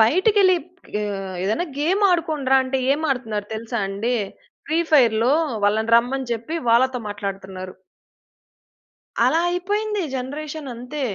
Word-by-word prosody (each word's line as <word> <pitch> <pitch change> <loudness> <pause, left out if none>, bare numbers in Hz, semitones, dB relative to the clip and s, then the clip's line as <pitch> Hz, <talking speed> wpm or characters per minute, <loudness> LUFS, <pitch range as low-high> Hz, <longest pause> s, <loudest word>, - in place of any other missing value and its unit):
బయటికెళ్ళి 375 - +4 0.4
ఆహ్, 195 -3 -4
ఏదైనా 220 - 0
గేమ్ 360 +8 +1
ఆడుకోండిరా 310 -6 +2
అంటే, 260 +1 -1
ఏం 290 - -1
ఆడుతున్నారు 220 -6 -2
తెలుసా 230 +2 -4
అండి? 210 +5 -1 0.5
ఫ్రీ 320 0 +1
ఫైర్‌లో 235 -3 +5 0.3
వాళ్ళని 220 +2 +1
రమ్మని 255 +2 0
జెప్పి 235 +9 -4
వాళ్ళతో 255 +2 +3
మాట్లాడుతున్నారు. 195 -2 -6 1.5
అలా 325 - +3
అయిపోయింది 410 +4 -1
జనరేషన్ 285 +3 -5
అంతే. 250 +5 -6
255 Hz, 115 wpm, -22 LUFS, 220-315 Hz, 1.5 s, ఫైర్‌లో